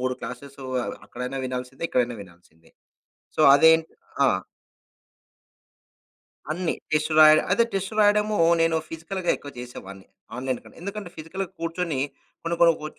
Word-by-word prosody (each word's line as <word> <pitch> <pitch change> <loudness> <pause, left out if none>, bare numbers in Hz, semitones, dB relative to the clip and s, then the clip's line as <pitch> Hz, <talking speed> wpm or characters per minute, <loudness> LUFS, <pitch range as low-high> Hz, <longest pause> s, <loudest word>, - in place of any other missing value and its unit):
3 130 0 -1
classes 135 +3 -8 0.2
అ - - -3 0.2
అక్కడైనా 125 +2 -5
వినాల్సిందే, 125 +2 -6
ఇక్కడైనా 120 -1 0
వినాల్సిందే. 85 -3 -21 0.7
సో, - - +3
అదేంటి 160 +2 +5 0.3
ఆ! - - +5 2.3
అన్ని 175 0 -1 0.2
టెస్ట్ 155 +1 +1
రాయడం. 155 0 +8
అయితే, 205 +5 +4
టెస్ట్ 195 +2 -2
రాయడము 210 0 +3 0.2
నేను 165 0 +3
ఫిజికల్‌గా 170 +3 -3
ఎక్కువ 145 - -11
చేసేవాడిని 100 -6 -9 0.3
ఆన్‌లైన్‌ 130 -1 -2
కంటే. - - -16
ఎందుకంటే, 200 -1 -6
ఫిజికల్‌గా 170 +4 -5
కూర్చొని 165 -3 -2 0.4
కొన్ని 170 0 -2
కొన్ని 170 -1 +6
కోచ్ 155 0 -7
155 Hz, 130 wpm, -25 LUFS, 125-175 Hz, 2.3 s, రాయడం